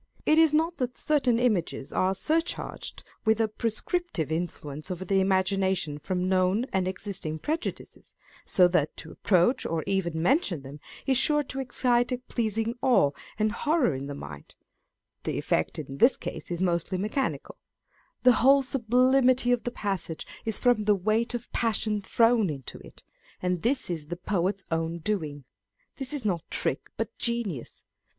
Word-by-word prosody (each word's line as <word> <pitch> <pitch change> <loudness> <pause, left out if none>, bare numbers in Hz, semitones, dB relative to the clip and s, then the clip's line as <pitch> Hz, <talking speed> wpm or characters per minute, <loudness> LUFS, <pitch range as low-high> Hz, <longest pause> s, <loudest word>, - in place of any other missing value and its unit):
It 310 +1 +5
is 325 -2 +6
not 325 +3 +1
that 250 -1 -3
certain 270 -6 +2
images 190 - 0
are 190 +1 +1
surcharged 325 - -2 0.2
with 220 0 +3
a 225 - +3
prescriptive 220 - -2
influence 155 -2 -4
over 185 0 -4
the 195 +1 +2
imagination 190 -4 +1
from 180 +3 -2
known 185 +5 +2
and 190 -1 +1
existing 185 -4 -4
prejudices, 315 - -5 0.3
so 180 -3 +4
that 155 -4 0
to 160 - -8
approach 190 +6 +2
or 160 -1 -2
even 175 -4 -1
mention 175 - +1
them 140 +2 -10 0.3
is 265 -2 +4
sure 295 +1 +3
to 270 -1 -5
excite 245 -1 +1
a 250 - 0
pleasing 225 -2 -2
awe 240 - +4 0.3
and 215 0 +1
horror 295 - +1
in 135 +1 -5
the 145 - -5
mind 75 - -10 0.7
(the - - -2
effect 80 - 0
in 140 -3 -7
this 260 - +5
case - - -7
is 175 -1 -3
mostly 175 0 0
mechanical) 215 +8 -2
â€" - - -41
the 250 - +8
whole 275 +2 +6
sublimity 255 0 +3
of 245 -1 +1
the - - 0
passage 195 -8 -3 0.2
is 220 -2 -1
from 245 -4 +3
the 210 -1 +4
weight 215 +5 0
of 240 0 -6
passion 215 -2 0
thrown 230 -1 +3
into 135 -4 -7
it, - - -15 0.4
and 180 -1 -1
this 260 +3 +1
is 160 -4 -4
the 175 +2 -5
poet's 190 +1 -1
own 165 +1 -1
doing. 155 -6 -3 0.5
This 270 -2 -5
is 285 -6 -1
not 180 -5 0
trick, - - -2
but - - -3
genius. 235 - -3
205 Hz, 165 wpm, -27 LUFS, 175-245 Hz, 0.7 s, the